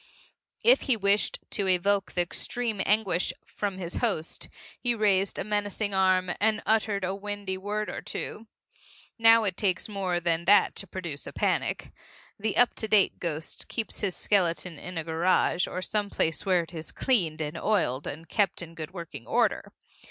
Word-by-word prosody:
If - - +6
he 245 - +4
wished 200 0 +2
to 200 - -1
evoke 195 +2 +2
the 175 - +2
extreme 225 +4 -2
of - - -1
anguish 205 -4 +2
from 200 -2 -4
his 175 -2 -4
host, 195 -10 -1 0.3
he 240 -1 +1
raised 200 -3 +2
a - - -1
menacing 205 0 -1
arm 185 -1 +3
and 220 +1 +2
uttered 215 -2 +1
a 185 +1 0
windy 200 -1 -4
word 210 +3 -3
or - - -5
two. 220 +1 -6 0.7
Now 225 0 +7
it 195 -4 0
takes 185 -3 0
more 190 -4 -1
than 170 -1 0
that 205 +2 +5
to 195 - -2
produce 170 -6 -6
a - - -7
panic. - - 0 0.5
The 215 +1 -1
up 245 - +5
to 220 - -1
date 210 -3 +3
ghost 160 -2 -3
keeps 225 -2 -3
his 195 -4 -2
skeleton 175 -4 0
in 180 -1 -7
a 165 - -1
garage 170 +2 +2
or 185 - -4
some 205 0 -1
place 160 +1 -1
where 180 -2 +3
it 165 - -13
is 160 -1 -7
cleaned 175 -12 +1
and 150 0 -3
oiled 165 -8 0
and 160 +3 -6
kept 195 -1 +1
in 165 0 -10
good 165 +3 -8
working 170 -9 -8
order. - - +1
190 Hz, 180 wpm, -28 LUFS, 175-210 Hz, 0.7 s, Now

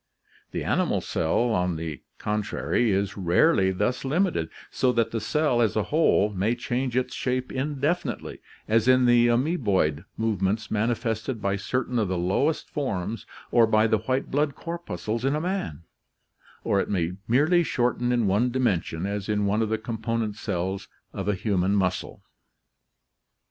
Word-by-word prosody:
The - - -4
animal - - +1
cell, 100 +9 0
on 90 -4 +1
the 80 -4 -5 0.2
contrary, 105 +2 0
is 100 0 0
rarely 95 - +3
thus 105 +8 -1
limited, 145 - 0 0.2
so 130 0 +2
that 115 -2 +1
the 115 - -2
cell, 145 +1 +1
as 110 - +2
a 110 - +2
whole, 150 -9 +3
may 100 +5 0
change 125 +1 -2
its 130 0 0
shape 130 0 -2
indefinitely 145 +5 -2 0.3
as 115 +1 +2
in 130 0 +5
the 120 0 +5
amoeboid 115 - +1
movements 110 0 -1
manifested 115 +2 -1
by 100 -1 0
certain 125 +4 -1
of 105 - +1
the 95 0 -1
lowest 95 - 0
forms 115 -6 -3 0.2
or 115 -2 +5
by 110 0 +4
the 110 -1 +2
white 130 +5 -2
blood 145 0 +1
corpuscles 165 -9 -4
in 135 +2 +1
a 150 - -1
man, 175 - -3 0.8
or 100 - +2
it - - -1
may 85 -4 0 0.2
merely 150 +9 +4
shorten 125 -5 0
in 120 -2 +2
one 105 +6 +2
dimension, 95 -9 0
as 100 +1 -3
in 105 -1 +1
one 105 +2 +1
of 110 - 0
the 110 - +1
component 110 -1 -3
cells 95 -2 -3 0.3
of - - -4
a 105 - +2
human 95 -1 +1
muscle. 95 -3 -1
110 Hz, 160 wpm, -26 LUFS, 100-130 Hz, 0.8 s, in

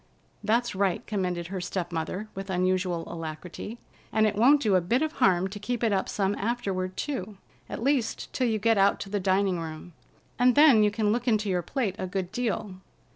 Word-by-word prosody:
"That's 230 +3 +1
right," 190 -2 0
commended 180 -4 -2
her 190 -1 -4
step 180 -1 -3
mother, 170 +6 -3
with 195 +1 -7
unusual 185 -2 0
alacrity. 165 +7 -7 0.3
"And 220 0 +3
it 210 -1 +1
won't 265 +8 +5
do 210 -3 +2
a 185 - +4
bit 235 - +1
of 315 - -1
harm 185 - +2
to 205 +2 -7
keep 240 +3 -3
it 220 -3 +2
up 190 - 0
some 195 -1 0
afterward 195 -5 -2
too, 215 -8 -4 0.3
at - - -5
least, 265 -4 0
till 255 - +1
you 220 -1 +1
get 225 0 +2
out 200 +1 +4
to 195 - -7
the 205 - 0
dining 190 -1 +1
room, 160 +1 -7 0.5
and 250 0 +5
then 290 -7 +7
you 210 - +4
can 210 0 0
look 240 +3 -1
into 215 -3 +2
your 180 -1 +1
plate 205 - -2
a 185 - -2
good 185 -1 -3
deal. 215 -4 -2
200 Hz, 205 wpm, -27 LUFS, 185-230 Hz, 0.5 s, then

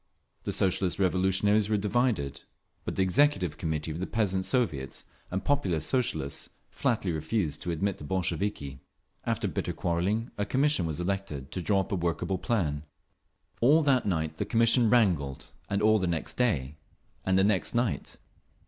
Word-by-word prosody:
The - - -1
Socialist 95 -1 +1
Revolutionaries 95 +3 +2
were 105 - +2
divided; 105 - 0 0.4
but - - -3
the 95 - +2
Executive 95 - +2
Committee 80 -1 -2
of 80 - -5
the 95 - -2
Peasants's 95 -4 0
Soviets 85 - -1 0.2
and 95 +1 -2
the - - -23
Populist 135 - +1
Socialists 80 - -1 0.2
flatly 115 -9 0
refused 80 +1 -2
to - - -4
admit 95 +4 -1
the - - -9
Bolsheviki…. 85 -4 -2 0.5
After - - 0
bitter - - -2
quarrelling 95 +7 -1
a 105 - +1
commission 135 - +2
was 80 0 -4
elected 90 -7 -3
to 90 - -3
draw 100 +2 +2
up 105 - -7
a - - +1
workable 85 +1 -1
plan…. 80 -11 0 0.8
All 150 +7 +5
that 135 -6 +2
night 80 -4 -1
the - - -1
commission 115 0 +4
wrangled, 90 - +1 0.2
and 100 +1 0
all 110 0 +5
the 95 - 0
next 85 -2 -2
day, 75 - 0 0.5
and 95 0 +2
the 95 - +5
next 100 +2 +1
night. 120 -1 -1
95 Hz, 165 wpm, -28 LUFS, 80-110 Hz, 0.8 s, All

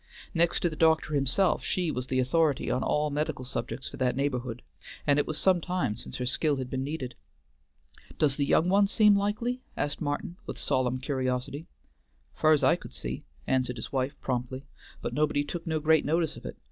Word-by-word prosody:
Next 170 +1 +3
to - - +3
the - - -6
doctor 160 -1 +3
himself, 140 +6 +2
she 180 -4 0
was 125 -2 -4
the 130 - -1
authority 140 +3 +2
on 125 - 0
all 150 0 +1
medical 150 -3 -2
subjects 125 +1 -4
for - - -8
that 125 -1 +1
neighborhood, 125 -3 -2 0.4
and 145 -1 +4
it - - 0
was 155 - -2
some 185 -2 +3
time 180 - -1
since 120 - -7
her 125 - -2
skill 145 +4 +1
had 130 -2 -5
been 130 0 -1
needed. 135 -3 -4 1.0
"Does 145 -3 +3
the 145 - 0
young 165 - +4
one 200 +2 +4
seem 210 0 +5
likely?" 215 +5 -1 0.2
asked 145 0 -2
Martin 150 +3 -3
with - - -5
solemn 130 -2 +1
curiosity. 130 +2 -2 0.7
"Fur's 155 -2 +3
I - - +5
could - - -12
see," - - -5 0.2
answered 130 -1 +1
his 110 - -6
wife 135 +1 -1
promptly, 130 +1 -3 0.4
"but - - -3
nobody 150 -1 +1
took 170 +3 -6
no 160 -1 0
great 155 +1 +4
notice 160 0 +1
of - - -8
it. - - -8
145 Hz, 195 wpm, -28 LUFS, 130-160 Hz, 1.0 s, seem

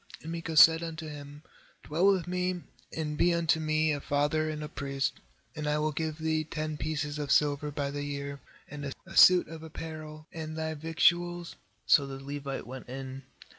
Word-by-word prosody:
10And 160 - -6
Micah 165 -1 -4
said 160 +1 +9
unto 165 -1 -5
him: 145 0 -9 0.4
'Dwell 165 +6 +2
with 185 -3 0
me, 180 0 -1 0.3
and 150 -2 -3
be 175 - +5
unto 165 -1 +2
me 155 0 +1
a 145 - -3
father 145 +3 +1
and 150 -1 -4
a - - -4
priest, 140 -1 -2 0.4
and 150 -1 -3
I 150 0 +2
will 155 0 0
give 155 +1 -3
thee 160 -1 0
ten 155 0 -4
pieces 150 0 -3
of 145 -1 -3
silver 150 0 +3
by 140 -1 -2
the 145 0 -4
year, 140 0 -4 0.3
and 145 -1 -6
a 190 - -11
suit 180 -1 +8
of 160 0 -9
apparel, 155 -1 -8
and 155 -1 -5
thy 160 0 -2
victuals.7 175 +2 +1 0.3
So 140 -2 +5
the 135 0 -7
Levite 140 0 -5
went 130 0 -9
in. 130 0 -7
155 Hz, 185 wpm, -30 LUFS, 145-160 Hz, 0.4 s, said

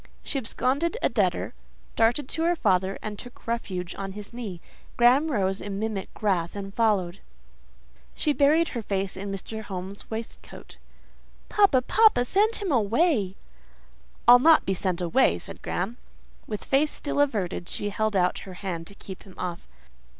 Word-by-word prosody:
She 275 - -1
absconded 275 - 0
a - - +4
debtor, - - 0 0.4
darted 235 +4 +2
to 325 - -2
her 350 +1 +3
father, 190 - +1
and 210 -2 -5
took 245 -1 -12
refuge 190 -6 -3
on 195 -1 -6
his 205 +2 -9
knee. 215 -8 -6 0.4
Graham 255 +6 +5
rose 195 -5 0
in 200 -1 -4
mimic 215 -2 -3
wrath 180 -4 +1
and 195 -1 -6
followed. 200 -5 +1 1.0
She 300 - +1
buried 305 +4 +4
her 235 - -4
face 195 -2 -2
in 195 +1 -5
Mr. 220 +3 -5
Home's 195 -1 -7
waistcoat. 225 0 -8 0.7
"Papa—papa—send 405 - +4
him 400 -5 -3
away!" 230 - +2 0.9
"I'll 245 +1 +10
not 315 +4 +6
be 195 - +1
sent 185 -1 -2
away," 175 +10 +3
said - - -8
Graham. 195 +7 -3 0.5
With 210 -2 -5
face 285 +3 +3
still 285 -1 -2
averted, 195 -10 -1
she 205 - -3
held 215 0 -1
out 180 -1 +2
her 185 -2 -10
hand 175 -4 -5
to 200 - -10
keep 190 -1 -9
him 190 - -15
off. 175 -2 -5
215 Hz, 155 wpm, -26 LUFS, 190-260 Hz, 1.0 s, I'll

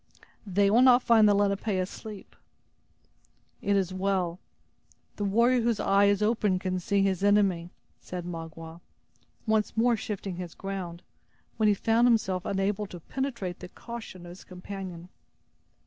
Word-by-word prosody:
"They 200 +1 +2
will 235 +3 +5
not 255 -1 +6
find 220 -3 +5
the 205 - +4
Lenape 200 +1 0
asleep." 195 +1 -4 1.3
"It 200 - +1
is 190 -2 0
well. 185 -2 -1 0.8
The 205 - -2
warrior 235 +5 +3
whose 230 -2 0
eye 200 +1 +3
is 200 +1 +2
open 210 -3 +1
can 185 0 -2
see 200 +2 +1
his 195 -1 0
enemy," 195 -4 +2 0.3
said 180 -1 -7
Magua, 165 -1 -8 0.6
once 220 -1 0
more 235 +1 +4
shifting 200 -4 -5
his 180 -2 -7
ground, 185 -3 -6 0.5
when 220 - +3
he 205 - +3
found 230 +4 +3
himself 190 -6 +1
unable 200 +1 -1
to 180 - -9
penetrate 235 - -4
the 180 - -9
caution 225 -7 -9
of 175 - -9
his 180 - -12
companion. 180 -1 -8
195 Hz, 145 wpm, -28 LUFS, 180-215 Hz, 1.3 s, not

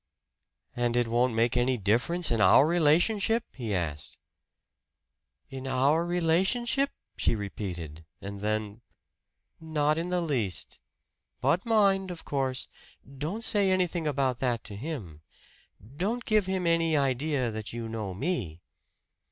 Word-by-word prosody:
"And 120 0 0
it 120 -1 +2
won't 120 +1 +1
make 115 +1 +2
any 125 +1 +2
difference 125 - +1
in 115 -2 +2
our 95 +8 +7
relationship?" 175 +8 +3
he 115 -6 -3
asked. 75 -5 -3 1.3
"In 135 0 -6
our 135 +5 +2
relationship?" 190 - +1 0.3
she - - +1
repeated; 90 -6 -6 0.2
and 100 0 -7
then, 105 +1 -2 0.8
"Not 155 -1 0
in 170 +2 -3
the 180 -1 0
least. 125 - -2 0.6
But 185 +7 +1
mind, 195 -4 +3
of 175 -2 -8
course, 135 -2 -1 0.5
don't 165 +12 -4
say 205 -4 +2
anything 180 -3 +1
about 135 -4 0
that 120 -4 0
to 100 - -8
him. 105 - -6 0.8
Don't 225 +8 -1
give 215 -4 +2
him 190 -1 -1
any 165 -2 +2
idea 135 -2 0
that 110 -1 -6
you 115 -1 -5
know 110 -4 -4
me!" 110 - -2
135 Hz, 130 wpm, -28 LUFS, 115-175 Hz, 1.3 s, our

